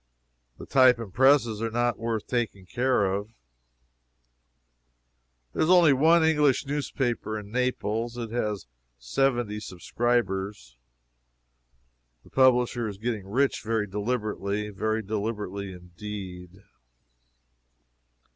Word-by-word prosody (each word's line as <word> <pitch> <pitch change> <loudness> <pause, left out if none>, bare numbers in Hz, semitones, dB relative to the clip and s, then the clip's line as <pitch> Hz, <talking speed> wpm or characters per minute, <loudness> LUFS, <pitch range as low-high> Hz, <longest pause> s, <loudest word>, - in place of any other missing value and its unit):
The - - -9
type 130 -2 +5
and 110 -5 -8
presses 130 -4 +4
are 115 - -1
not 120 +1 0
worth 115 -2 -2
taking 115 -6 -2
care 125 +1 +1
of. 100 +2 -2 2.2
There - - -2
is 155 - +2
only 175 -5 +7
one 160 +5 +4
English 150 -4 +3
newspaper 135 -6 -2
in 105 -1 -9
Naples. 120 -1 -1
It 115 -2 -5
has 105 - -2 0.3
seventy 110 - 0
subscribers. 95 - -2 1.5
The - - -20
publisher 125 -3 +3
is 100 -2 -6
getting 110 -3 -3
rich 135 +7 +1
very 110 -1 -1
deliberately 105 -1 -2
very 110 +2 -2
deliberately 105 -2 -4
indeed. 90 0 -9
110 Hz, 105 wpm, -26 LUFS, 100-125 Hz, 2.2 s, only